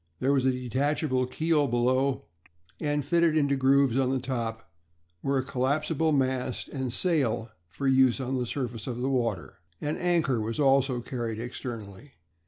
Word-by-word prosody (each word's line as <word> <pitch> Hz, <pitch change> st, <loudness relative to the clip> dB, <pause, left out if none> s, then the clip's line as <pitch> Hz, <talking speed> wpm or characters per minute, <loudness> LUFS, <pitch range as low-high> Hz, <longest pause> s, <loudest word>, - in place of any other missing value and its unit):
There 135 Hz, +2 st, +2 dB
was 130 Hz, -2 st, +2 dB
a -, -, +4 dB
detachable 130 Hz, +1 st, 0 dB
keel 155 Hz, +1 st, +1 dB
below; 130 Hz, +3 st, +1 dB, 0.6 s
and 145 Hz, -2 st, -1 dB
fitted 170 Hz, 0 st, +3 dB
into 140 Hz, -2 st, +2 dB
groves 135 Hz, -1 st, +3 dB
on 130 Hz, -1 st, +2 dB
the 135 Hz, -, +1 dB
top 115 Hz, -5 st, -4 dB, 0.5 s
were 135 Hz, 0 st, 0 dB
a 130 Hz, -, 0 dB
collapsible 145 Hz, +4 st, 0 dB
mast 130 Hz, -3 st, -1 dB
and 130 Hz, -3 st, -3 dB
sail 125 Hz, -7 st, 0 dB, 0.2 s
for 135 Hz, +11 st, -3 dB
use 130 Hz, -1 st, +4 dB
on 130 Hz, 0 st, -2 dB
the 125 Hz, -, -2 dB
surface 120 Hz, -4 st, -4 dB
of 120 Hz, -2 st, -3 dB
the 130 Hz, +2 st, 0 dB
water. 115 Hz, -8 st, -2 dB, 0.2 s
An 150 Hz, +1 st, -2 dB
anchor 165 Hz, -9 st, +1 dB
was 110 Hz, +4 st, -3 dB
also 135 Hz, -3 st, +3 dB
carried 115 Hz, -3 st, -4 dB
externally. 120 Hz, 0 st, -7 dB
130 Hz, 160 wpm, -28 LUFS, 120-140 Hz, 0.6 s, a